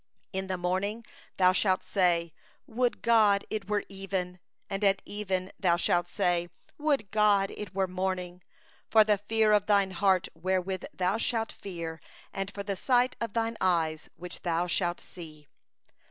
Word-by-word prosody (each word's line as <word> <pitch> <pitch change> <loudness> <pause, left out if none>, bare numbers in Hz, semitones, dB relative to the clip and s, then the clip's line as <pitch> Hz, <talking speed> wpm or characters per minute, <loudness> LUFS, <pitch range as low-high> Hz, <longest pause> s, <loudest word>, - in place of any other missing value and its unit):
67In 190 0 -3
the 185 -1 -2
morning 190 +6 -2 0.3
thou 185 -1 +6
shalt 185 0 +1
say: 170 -4 +1 0.3
'Would 245 +1 -1
it 210 -2 +3
were 210 -1 +1
even! 190 -2 -4
' - - -48
and 195 +1 -2
at 195 -1 +4
even 190 -2 -3
thou 175 -3 +3
shalt 175 -1 +1
say: 175 -1 0 0.3
'Would 295 -6 +1
it 205 -1 +2
were 190 -1 +1
morning! 185 -1 -3 0.2
' - - -32
for 220 -1 +7
the 210 -2 +2
fear 220 +1 +2
of 210 -1 +3
thy 200 -2 +4
heart 190 0 +2
which 185 +2 -1
thou 185 +3 0
shalt 225 -1 -1
fear, 170 -4 -7 0.3
and 195 0 -3
for 200 0 -6
the 200 -1 -2
sight 250 +5 +2
of 230 -3 -3
thine 230 0 -1
eyes 165 -4 +1
which 180 0 -9
thou 170 0 0
shalt 175 0 -1
see. 155 -4 -12
190 Hz, 160 wpm, -29 LUFS, 180-210 Hz, 0.3 s, for